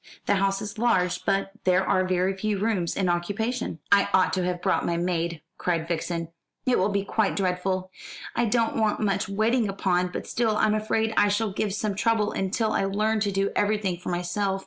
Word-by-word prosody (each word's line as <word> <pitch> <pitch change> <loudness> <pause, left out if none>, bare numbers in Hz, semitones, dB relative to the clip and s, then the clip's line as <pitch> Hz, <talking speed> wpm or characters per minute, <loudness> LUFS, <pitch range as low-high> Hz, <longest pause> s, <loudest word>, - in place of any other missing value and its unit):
The - - +3
house 195 0 0
is 210 0 -7
large, 180 -6 +1
but 195 0 +1
there 185 0 +2
are 185 - +3
very 185 +1 +1
few 210 +1 -1
rooms 195 -4 0
in 190 - +1
occupation." 205 +5 -1
"I 200 0 +5
ought 185 - +3
to 185 - 0
have 180 0 -1
brought - - +1
my 170 - 0
maid," 170 -2 -2 0.2
cried 165 -2 -1
Vixen. 170 0 -2 0.4
"It 255 - +3
will 190 +3 +2
be 200 -1 0
quite 215 0 0
dreadful. 185 0 -1 0.4
I 240 - +2
don't 230 0 +1
want 215 -1 +1
much 200 -1 0
waiting 220 +2 +1
upon; 180 -2 +1
but 180 - -6
still, 225 -3 0
I'm 215 -1 +3
afraid 220 +1 0
I 205 - +5
shall 205 +1 0
give 205 +1 -1
some 210 -1 -1
trouble 215 +1 +1
until 215 +3 -1
I 195 - +1
learn 215 +3 +1
to 205 -1 0
do 195 +1 0
everything 205 -3 +1
for 175 - -7
myself. 180 +3 -1
195 Hz, 200 wpm, -26 LUFS, 180-215 Hz, 0.4 s, I